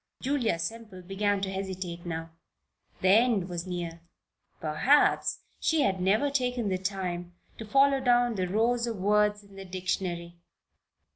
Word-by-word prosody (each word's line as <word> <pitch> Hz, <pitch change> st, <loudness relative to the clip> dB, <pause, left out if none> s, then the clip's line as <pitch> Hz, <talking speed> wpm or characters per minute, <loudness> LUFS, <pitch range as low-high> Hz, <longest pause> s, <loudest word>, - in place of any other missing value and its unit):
Julia 255 Hz, -8 st, 0 dB
Semple 210 Hz, +1 st, -6 dB
began 200 Hz, +2 st, 0 dB
to 195 Hz, -1 st, -2 dB
hesitate 185 Hz, -3 st, -5 dB
now. 165 Hz, -1 st, -4 dB, 0.7 s
The 185 Hz, -, +3 dB
end 215 Hz, -2 st, +4 dB
was 175 Hz, 0 st, -5 dB
near. 170 Hz, -2 st, -5 dB, 0.6 s
Perhaps 165 Hz, -, +2 dB, 0.2 s
she 320 Hz, -2 st, +2 dB
had 190 Hz, -8 st, +1 dB
never 215 Hz, +10 st, +2 dB
taken 250 Hz, -5 st, 0 dB
the 185 Hz, -1 st, -1 dB
time 180 Hz, -2 st, -4 dB, 0.2 s
to 220 Hz, -, -6 dB
follow 275 Hz, +3 st, +4 dB
down 245 Hz, -2 st, +3 dB
the 185 Hz, -3 st, -1 dB
rows 235 Hz, +5 st, +1 dB
of 230 Hz, -2 st, -3 dB
words 210 Hz, +1 st, +2 dB
in 200 Hz, -1 st, -17 dB
the 195 Hz, -, -7 dB
dictionary. 180 Hz, -2 st, -3 dB
195 Hz, 145 wpm, -28 LUFS, 180-230 Hz, 0.7 s, end